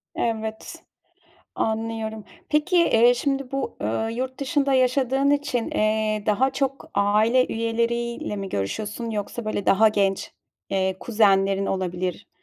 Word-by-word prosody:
Evet, 220 -1 -3 0.7
anlıyorum. 220 -1 -3 0.2
Peki, 305 +4 +2
eee, 245 -8 +5
şimdi 275 +1 -2
bu, 275 0 -3
ııı, 115 - -1
yurt 255 +2 -4
dışında 280 -1 +1
yaşadığın 260 +1 +2
için, 285 -5 0
eee, 215 0 0
daha 235 +6 +2
çok 270 0 -2
aile 215 +5 +3
üyeleriyle 235 0 -2
mi 195 -1 -5
görüşüyorsun, 210 - -3
yoksa 215 +2 -4
böyle 215 -2 -2
daha 220 +3 +5
genç, 200 -2 0 0.4
eee, 190 -1 0
kuzenlerin 195 -3 +2
olabilir, 180 -1 -3
225 Hz, 120 wpm, -24 LUFS, 205-255 Hz, 0.7 s, eee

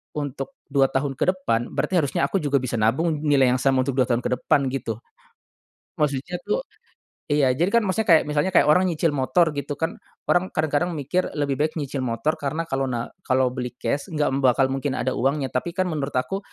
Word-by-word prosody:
untuk 145 - -4 0.2
2 135 -1 +4
tahun 135 +1 -1
ke - - +1
depan 120 -11 -2
berarti 185 - +1
harusnya 140 -3 0
aku 165 +8 +1
juga 145 -3 -1
bisa 125 -4 0
nabung 145 +9 +1
nilai 140 -4 +3
yang 125 - +1
sama 130 0 +2
untuk 135 0 -2
2 125 - +3
tahun 120 -1 0
ke - - -2
depan 140 - +2
gitu. 120 -4 -3 1.0
Maksudnya 145 +3 -1
tuh - - -2 0.6
iya, 145 -3 +3
jadi 170 - 0
kan 235 - +5
maksudnya 210 +2 -1
kayak 165 -5 +6
misalnya 150 +5 +1
kayak 150 - +5
orang 180 +5 +4
nyicil 165 -2 +1
motor 150 +4 +2
gitu 145 0 -4
kan 160 +3 -3 0.3
orang 180 +1 +1
kadang-kadang 155 +3 0
mikir 160 +5 -1
lebih 140 -3 -1
baik 155 +1 0
nyicil 145 -3 -4
motor 120 +7 -1
karena 150 +3 -2
kalo 135 0 0
na 120 -3 -3 0.2
kalo 130 -1 +2
beli 125 -1 -5
cash 145 - -1
enggak 150 -2 +1
bakal 135 0 +3
mungkin 135 0 -2
ada 130 - -1
uangnya 135 +1 0
tapi 170 +7 -3
kan 185 -1 0
menurut 145 -3 -3
aku, 130 +10 -1
145 Hz, 205 wpm, -23 LUFS, 130-160 Hz, 1.0 s, kayak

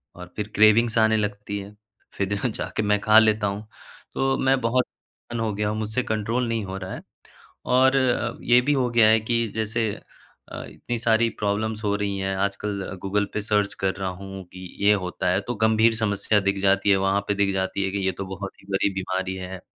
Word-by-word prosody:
और 90 0 -11
फिर 105 -1 -3
क्रेविंग्स 110 +2 +5
आने 110 0 +4
लगती 105 -1 -3
है, 100 +1 -10 0.4
फिर 100 0 -2
जा 100 - -1
जाके 110 0 -3
मैं 105 0 +2
खा 110 +1 +7
लेता 110 -1 +2
हूँ। 105 +2 -5 0.5
तो 135 0 +1
मैं 130 0 +2
बहुत 125 +2 +2 0.6
हो 110 -2 -1
गया 105 +1 -1
हूँ, 110 - -2
मुझसे 110 +4 -1
कंट्रोल 110 +3 -1
नहीं 115 -2 -1
हो 95 0 -5
रहा 95 0 -6
है। - - -7 0.7
और 130 +2 +4
अ, 125 -2 +1
ये 120 +1 +5
भी 145 +4 +1
हो 130 -3 +1
गया 115 -2 +5
है 110 0 +5
कि 115 +1 0
जैसे 110 0 0 0.6
अ, - - -6
इतनी 120 -1 -5
सारी 115 0 +3
प्रॉब्लम्स 105 +2 -1
हो 100 0 +1
रही 100 -1 -2
हैं 95 0 -2
आजकल 100 -1 -3
गूगल 105 +1 0
पे 105 - 0
सर्च 105 -1 0
कर 95 0 +2
रहा 95 -1 -3
हूँ 95 0 -8
कि 95 - -10 0.2
ये 105 - +6
होता 90 0 -2
है 95 - +2
तो 120 - -1
गंभीर 110 +1 +3
समस्या 105 -1 +1
दिख 100 0 0
जाती 100 +1 +3
है, 95 - +6
वहाँ 95 +1 +1
पे 100 - +2
दिख 100 -1 +1
जाती 95 +1 -1
है 95 - -1
कि 100 - -2
ये 95 - +2
तो 95 - -6
बहुत 95 +1 -6
ही - - -20
बड़ी 100 0 +1
बीमारी 95 0 -2
है, 95 0 -7
105 Hz, 215 wpm, -24 LUFS, 100-110 Hz, 0.7 s, खा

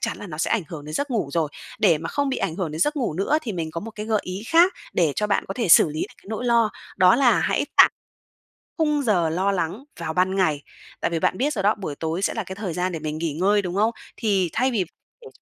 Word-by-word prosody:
chắn - - -2
là - - -8
nó 155 -5 -8
sẽ - - 0
ảnh 225 - +2
hưởng 150 -3 -8
đến 155 +1 -7
giấc 285 - -2
ngủ 220 - -1
rồi. 165 -3 +1 0.3
Để 170 -7 +4
mà 165 - -5
không 285 -1 -1
bị 265 - -1
ảnh 165 - -2
hưởng 180 -5 -2
đến 155 +1 -5
giấc 295 - +2
ngủ 245 - -1
nữa 200 - +1
thì 225 - -4
mình 165 -4 -3
có 165 - -5
một 225 - -7
cái 215 0 -7
gợi 220 -2 +1
ý 185 +2 -6
khác 345 +3 +5 0.2
để 165 -5 +2
cho 210 - +1
bạn 205 - +1
có 195 - -4
thể 230 -4 -1
xử 165 - +7
lý 155 +1 -4
được - - -4
cái - - -22
nỗi 220 +3 -4
lo, 235 -2 +3 0.3
đó 185 +3 +6
là 250 -2 +4
hãy - - 0
tạm - - +8 0.9
khung 300 -3 +1
giờ 180 -9 +2
lo 185 +5 +1
lắng 195 +5 -2 0.2
vào 160 - -3
ban 185 +2 +1
ngày. 160 -7 +1 0.4
Tại - - 0
vì 165 - 0
bạn 185 - +1
biết 290 +5 0
rồi 195 - -2
đó, 210 +2 +3
buổi 185 -8 -5
tối 160 +4 -3
sẽ - - 0
là 225 - -3
cái 190 0 -8
thời 195 -4 -4
gian 180 +2 -1
để 165 - -4
mình 155 0 -4
nghỉ 160 -2 -2
ngơi, 200 +6 +2
đúng 180 -2 -4
không? 215 +3 +3 0.3
Thì 195 -5 +1
thay 255 +3 +1
vì 205 -6 0 0.4
để 460 - -12
195 Hz, 285 wpm, -23 LUFS, 165-225 Hz, 0.9 s, tạm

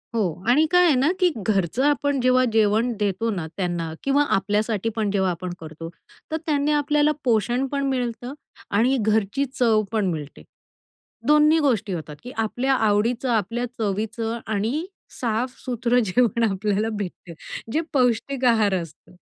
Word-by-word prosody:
हो 225 - +2 0.3
आणि 295 +6 +5
काय 360 0 +5
आहे 315 -5 +4
ना, 265 +4 +3
की 365 -2 +4
घरचं 205 +2 0
आपण 285 -1 +1
जेव्हा 255 +1 +4
जेवण 220 +2 +3
देतो 205 +2 0
ना, 175 -6 -3
त्यांना 175 -4 -2
किंवा 280 +1 +3
आपल्यासाठी 210 +2 0
पण 215 -3 0
जेव्हा 190 -2 +1
आपण 175 +1 -5
करतो 160 +1 -8 0.4
तर 320 - 0
त्यांनी 295 -1 +1
आपल्याला 295 0 +2
पोषण 240 +2 +1
पण 280 -1 -1
मिळतं 245 0 -3 0.4
आणि 240 +6 +2
घरची 215 +5 +1
चव 225 -3 +3
पण 220 -3 0
मिळते. 150 -3 -7 0.8
दोन्ही 300 +2 +5
गोष्टी 230 -9 +1
होतात 155 -3 -6
की 250 - -8
आपल्या 245 +5 0
आवडीचं 225 +3 +1
आपल्या 230 +2 0
चवीचं 225 +2 -2
आणि 220 - -1 0.3
साफसूत्रं 245 +1 -1
जेवण 235 +3 +2
आपल्याला 205 +2 -1
भेटते 180 -3 -6 0.4
जे 315 - +1
पौष्टिक 255 0 +1
आहार 220 -4 +3
असतं. 170 +2 -13
225 Hz, 145 wpm, -23 LUFS, 205-260 Hz, 0.8 s, आणि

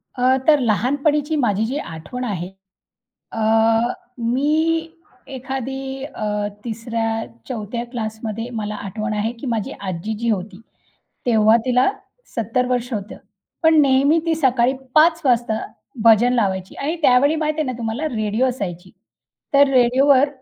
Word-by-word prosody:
अ, 255 +1 +3
तर 300 -2 +6
लहानपणीची 285 - +1
माझी 220 -7 +1
जी 260 +5 -3
आठवण 250 - -6
आहे 185 -6 -3 0.8
अ, - - -5 0.8
मी 305 +7 +1 0.5
एखादी 265 +1 -5
अ, 210 -6 -3 0.2
3ऱ्या-4थ्या 225 - -4
क्लासमध्ये 220 -1 -4
मला 210 0 -4
आठवण 215 +2 -4
आहे 215 +2 -1
की - - -6
माझी 230 -4 -2
आजी 190 +2 -4
जी 235 +1 -2
होती, 200 -1 -3 0.7
तेव्हा 220 -2 +5
तिला 250 0 +3 0.5
70 230 +2 0
वर्ष 245 0 -1
होतं, 210 -2 -4 0.5
पण 320 -1 +6
नेहमी 280 +3 +4
ती 330 - +2
सकाळी 260 -4 +2 0.2
5 325 +2 +5
वाजता 240 -4 +2 0.5
भजन 230 +2 +6
लावायची. 190 -6 -1
आणि 310 +5 -3
त्यावेळी 285 +3 +4
माहिती 310 0 -1
आहे 305 - 0
ना 255 - -2
तुम्हाला 235 +7 -2
रेडिओ 215 +3 0
असायची, 185 -8 -4 0.6
तर 280 0 +6
रेडिओवर 265 +2 +4
240 Hz, 130 wpm, -20 LUFS, 215-270 Hz, 0.8 s, तर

